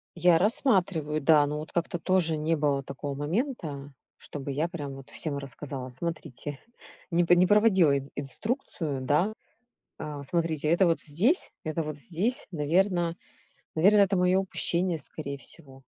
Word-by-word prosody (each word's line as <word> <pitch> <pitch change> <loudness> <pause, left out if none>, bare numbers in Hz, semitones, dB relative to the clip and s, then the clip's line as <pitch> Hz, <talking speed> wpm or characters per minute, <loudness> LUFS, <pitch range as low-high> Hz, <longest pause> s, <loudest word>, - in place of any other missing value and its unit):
Я 175 -1 +5
рассматриваю, 180 - +1
да, 150 0 +5
но 150 +1 -3
вот 155 - -8
как-то 170 0 -2
тоже 165 -3 +1
не 160 +2 +1
было 145 -2 0
такого 140 +1 -5
момента, 150 - -3 0.2
чтобы 140 -1 -7
я 150 +5 0
прям 145 -6 -6
вот 135 -1 -12
всем 150 -4 -3
рассказала. 135 -1 -6
Смотрите, 145 0 -5 0.5
не 175 +1 +3
п 175 +1 +5
не 180 - +5
проводила 190 -8 +5
ин 140 0 -7
инструкцию, 150 - -3
да. 150 +11 +1 0.7
А, 150 -2 -6
смотрите, 160 -1 -1
это 175 +3 +4
вот 165 - +2
здесь, 200 - +1
это 155 +1 -1
вот 155 -1 -5
здесь. 175 - -1
Наверно 170 +2 +1 0.6
наверно 200 +6 +5
это 195 -1 +4
мое 180 +1 +3
упущение 180 -2 +1
скорее 140 -2 -5
всего. 135 -1 -7
160 Hz, 150 wpm, -28 LUFS, 145-180 Hz, 0.7 s, Я